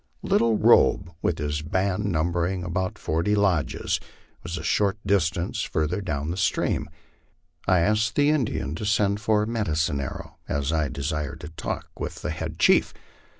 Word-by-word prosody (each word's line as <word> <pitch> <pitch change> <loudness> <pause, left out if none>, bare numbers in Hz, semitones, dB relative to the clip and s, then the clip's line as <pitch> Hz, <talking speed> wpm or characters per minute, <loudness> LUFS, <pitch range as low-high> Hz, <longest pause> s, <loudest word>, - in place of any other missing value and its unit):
Little 115 -2 +3
Robe, 100 -5 +4
with 80 - 0
his 75 0 -2
band 95 +4 -1
number 85 +1 +1
ing 90 -1 -3
about 90 +1 -2
forty 85 +7 0
lodges, 95 -7 +1 0.4
was 85 0 -5
a 80 - -6
short 100 +2 +1
distance 90 -3 +1
further 80 +5 -1
down 75 -4 -2
the 90 - -4
stream. - - 0 0.8
I 90 -1 +4
asked 105 +4 +1
the 145 +1 +4
Indian 110 - -1
to - - -5
send 105 -1 +2
for 105 0 +2
Medicine 80 -10 0
Arrow, 70 - -7
as 70 +2 -1
I 75 -3 +1
desired 70 +1 -3
to 75 - -7
talk 80 - -5
with - - -5
the - - -1
head - - -5
chief. - - +4
90 Hz, 160 wpm, -25 LUFS, 80-100 Hz, 0.8 s, Robe